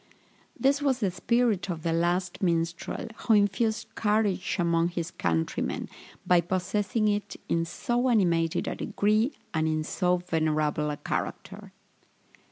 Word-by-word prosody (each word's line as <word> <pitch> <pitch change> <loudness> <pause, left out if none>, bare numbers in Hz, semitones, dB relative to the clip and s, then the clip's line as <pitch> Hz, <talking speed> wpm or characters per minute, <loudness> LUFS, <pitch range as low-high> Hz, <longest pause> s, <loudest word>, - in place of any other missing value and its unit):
This 280 +2 +3
was 275 -3 +2
the 200 -5 +1
spirit 220 +1 +1
of 165 -3 -4
the 165 -1 0
"Last 175 +2 0
Minstrel," 170 +1 -1
who 225 - +3
infused 220 +2 +1
courage 210 -4 +1
among 170 -1 +2
his 170 -1 -4
countrymen, 80 -1 -1 0.4
by 180 -1 +5
possessing 205 +5 0
it 205 0 -1
in 165 0 +1
so 240 +8 -1
animated 170 -6 +2
a - - -1
degree, 215 +6 +1 0.2
and 160 -1 +1
in 155 0 0
so 180 +2 +1
venerable 155 -3 0
a 145 - -3
character. - - -5
180 Hz, 135 wpm, -27 LUFS, 165-215 Hz, 0.4 s, by